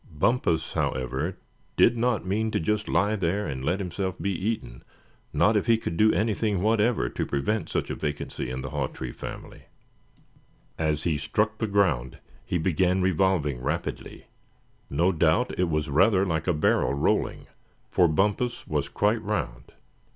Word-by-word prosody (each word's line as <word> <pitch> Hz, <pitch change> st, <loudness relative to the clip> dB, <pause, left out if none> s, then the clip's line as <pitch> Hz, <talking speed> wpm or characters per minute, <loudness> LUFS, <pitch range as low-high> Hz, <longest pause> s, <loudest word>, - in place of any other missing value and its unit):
Bumpus, 80 Hz, -1 st, 0 dB
however, 65 Hz, +7 st, -2 dB, 0.4 s
did 120 Hz, -, +5 dB
not 120 Hz, -3 st, 0 dB
mean 110 Hz, +4 st, 0 dB
to -, -, 0 dB
just 105 Hz, +5 st, -1 dB
lie 105 Hz, +2 st, +2 dB
there, 95 Hz, +2 st, -1 dB
and 65 Hz, -4 st, -4 dB
let 90 Hz, +7 st, +1 dB
himself 95 Hz, 0 st, -3 dB
be 100 Hz, -, -1 dB
eaten, 90 Hz, -, -3 dB, 0.5 s
not 110 Hz, -, +3 dB
if 105 Hz, -, +1 dB
he 115 Hz, -1 st, +5 dB
could 85 Hz, -, -4 dB
do 110 Hz, +5 st, +5 dB
anything 105 Hz, 0 st, 0 dB
whatever 110 Hz, -, +2 dB
to -, -, -3 dB
prevent 80 Hz, +7 st, -1 dB
such -, -, -2 dB
a -, -, -2 dB
vacancy 75 Hz, -4 st, -4 dB
in 65 Hz, +1 st, -4 dB
the 65 Hz, +1 st, -6 dB
Hawtree 65 Hz, -3 st, -3 dB
family. -, -, -9 dB, 1.1 s
As 75 Hz, -2 st, -1 dB
he 80 Hz, -4 st, 0 dB
struck 105 Hz, +8 st, -1 dB
the 110 Hz, -, 0 dB
ground 85 Hz, -, +1 dB, 0.3 s
he 90 Hz, -, -1 dB
began 90 Hz, +2 st, +1 dB
revolving 85 Hz, -7 st, +1 dB
rapidly. -, -, -4 dB, 0.6 s
No 85 Hz, +7 st, +2 dB
doubt 85 Hz, +8 st, +2 dB
it 90 Hz, -2 st, +2 dB
was 75 Hz, -1 st, 0 dB
rather 95 Hz, +7 st, +4 dB
like 80 Hz, -2 st, -2 dB
a 90 Hz, -, +3 dB
barrel 75 Hz, -2 st, +2 dB
rolling, 70 Hz, -, 0 dB, 0.5 s
for 90 Hz, -, +4 dB
Bumpus 105 Hz, +9 st, 0 dB
was -, -, -2 dB
quite 105 Hz, +2 st, +1 dB
round. 95 Hz, -, -3 dB
90 Hz, 160 wpm, -26 LUFS, 75-105 Hz, 1.1 s, did